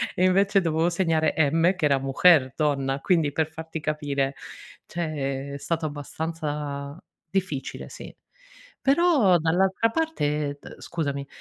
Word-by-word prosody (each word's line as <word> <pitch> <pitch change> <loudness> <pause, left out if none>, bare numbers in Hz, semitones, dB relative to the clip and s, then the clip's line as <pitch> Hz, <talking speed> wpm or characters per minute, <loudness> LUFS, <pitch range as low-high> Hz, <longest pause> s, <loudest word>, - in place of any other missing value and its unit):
e 180 - +1
invece 195 +2 +3
dovevo 165 0 +1
segnare, 165 -3 +1 0.2
M, 165 +4 +3
che 180 -4 -1
era 140 -2 +3
mujer, 135 0 +4
donna, 140 -3 0
quindi 165 -5 +2
per 160 0 +1
farti 160 +1 -7
capire 145 -3 -1 0.5
cioè, 140 -4 -3
è - - -4
stato 165 +2 -2
abbastanza 145 -1 -5 0.3
difficile, 185 -7 -3
sì. - - -10 0.7
Però 275 - +4
dall'altra 190 +7 +2
parte 150 - -1
d - - -11
scusami, 140 -4 -3
160 Hz, 125 wpm, -25 LUFS, 145-180 Hz, 0.7 s, mujer